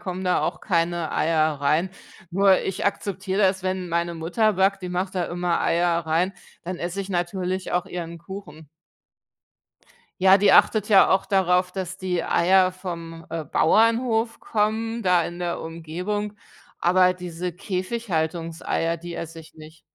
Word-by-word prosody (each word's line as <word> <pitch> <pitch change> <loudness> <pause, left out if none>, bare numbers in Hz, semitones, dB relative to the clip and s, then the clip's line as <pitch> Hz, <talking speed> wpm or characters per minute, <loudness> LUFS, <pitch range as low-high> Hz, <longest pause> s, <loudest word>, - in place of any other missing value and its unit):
kommen 185 0 -5
da 180 - +2
auch - - -2
keine 170 -3 0
Eier 155 -2 +1
rein. 155 +6 +1 0.4
Nur 195 +1 +4
ich 190 - -2
akzeptiere 200 0 -2
das, 190 0 +2
wenn 185 -1 -2
meine 170 0 -1
Mutter 190 +7 +1
backt, 195 +1 +1
die 180 - -4
macht 185 +2 -3
da 180 -2 0
immer 175 0 -1
Eier 170 0 +2
rein, 170 +4 +1 0.3
dann 180 +1 -5
esse 175 +3 -3
ich 195 0 -6
natürlich 180 +1 -2
auch 180 0 0
ihren 170 -1 -6
Kuchen. 170 -4 -10 1.6
Ja, 190 0 +8
die 200 -1 +4
achtet 215 -1 +4
ja 195 -2 +7
auch 190 - +2
darauf, 180 -1 +2
dass 185 -1 -5
die 185 -2 -2
Eier 185 +1 +3
vom, 170 -3 -7
äh, 165 0 -3
Bauernhof 225 - +2
kommen 225 +2 -1
da 180 -3 +3
in 175 +1 -6
der 175 -1 -3
Umgebung. 180 +6 -4 0.4
Aber 185 +1 +4
diese 180 -1 -5
Käfighaltungseier, 170 -4 -2
die 175 0 -8
esse 165 0 -7
ich 160 - -17
nicht. 155 +1 -14
180 Hz, 155 wpm, -24 LUFS, 170-195 Hz, 1.6 s, Ja